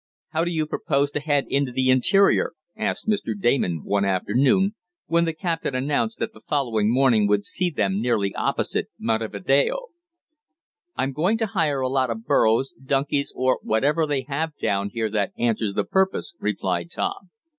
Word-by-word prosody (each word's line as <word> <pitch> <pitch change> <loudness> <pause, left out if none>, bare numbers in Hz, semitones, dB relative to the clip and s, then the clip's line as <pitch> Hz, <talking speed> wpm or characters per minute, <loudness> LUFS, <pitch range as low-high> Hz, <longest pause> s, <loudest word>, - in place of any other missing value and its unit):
"How 160 - 0
do 175 - -1
you 160 -3 0
propose 140 -2 0
to 150 - -2
head 145 -2 +1
into 140 -2 0
the 130 +1 +2
interior?" 195 +10 +3 0.2
asked 220 0 -3
Mr. 155 - -1
Damon 95 - +1
one 100 0 0
afternoon, 130 - +2 0.3
when 170 0 +2
the 165 - -1
captain 165 -4 -2
announced 145 +12 0
that 225 -1 -3
the - - -16
following 115 -7 0
morning 120 -5 +4
would 100 0 +1
see 180 - -1
them 100 - -1
nearly 105 -5 0
opposite - - -1
Montevideo. 115 - 0 1.1
"I'm 135 - -1
going 180 +10 +1
to 225 - 0
hire 150 -9 0
a 130 - +1
lot 130 -1 +1
of 115 0 -5
burrows, 115 +5 +2
donkeys 140 +1 0
or 130 0 +1
whatever 145 +8 +1
they 140 -3 -1
have 145 +3 -3
down 100 0 -1
here 110 -1 -2
that 100 -2 -1
answers 110 -4 0
the - - +1
purpose," 190 -2 0
replied 95 -5 -2
Tom. 190 - -3
135 Hz, 165 wpm, -24 LUFS, 110-160 Hz, 1.1 s, morning